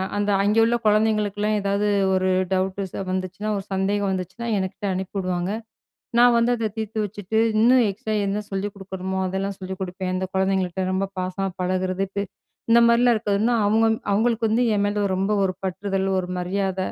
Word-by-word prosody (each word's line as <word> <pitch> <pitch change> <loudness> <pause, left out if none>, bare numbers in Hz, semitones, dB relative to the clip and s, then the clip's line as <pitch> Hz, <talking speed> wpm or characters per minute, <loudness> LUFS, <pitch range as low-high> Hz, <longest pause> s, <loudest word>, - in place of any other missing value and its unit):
அந்த 205 0 0
அங்கே 210 +2 +3
உள்ள 230 +1 +3
குழந்தைகளுக்கெல்லாம், 210 -1 +2
ஏதாவது 200 +1 0 0.3
ஒரு 185 0 +1 0.2
டவுட் 190 +1 -1
ச - - -41 0.2
வந்துச்சுனா 185 +3 -3
ஒரு 195 - -4
சந்தேகம் 200 +1 0
வந்துச்சுனா, 190 +5 -4
என்கிட்ட 190 +1 -4
அனுப்பி 190 +2 -5
வுடுவாங்க. 185 0 -1 0.7
நான் 245 0 +6
வந்து 235 +1 +3
அத 225 -1 -1
தீர்த்து 220 0 -4
வச்சுட்டு, 205 +1 -3 0.2
இன்னும் 245 +1 +5
எக்ஸ்ட்ரா 215 +2 -4
என்ன 205 +2 -1
சொல்லிக் 195 +1 -3
குடுக்கணுமோ 190 -1 -5
அதெல்லாம் 195 +1 -3
சொல்லிக் 190 0 -7
குடுப்பேன். 185 0 -3
அந்த 185 0 -1
குழந்தைங்கள்ட்ட 190 -1 0
ரொம்ப 195 +1 0
பாசமா 185 +1 -2
பழகுறது. 185 +1 0
பே 200 - 0 0.5
இந்த 235 - +7
மாரிலாம் 235 +1 +4
இருக்கதுன்னா 215 +2 +1
அவங்க 220 +2 +3 0.2
அவங்களுக்கு 225 +2 +2
வந்து 230 +3 +2
என் 205 0 +1
மேல 205 0 0
ரொம்ப 195 +2 0
ஒரு 185 - 0
பற்றுதல் 190 +1 -2
ஒரு 180 - -3
மரியாத. 190 +1 -2
195 Hz, 165 wpm, -23 LUFS, 190-215 Hz, 0.7 s, இந்த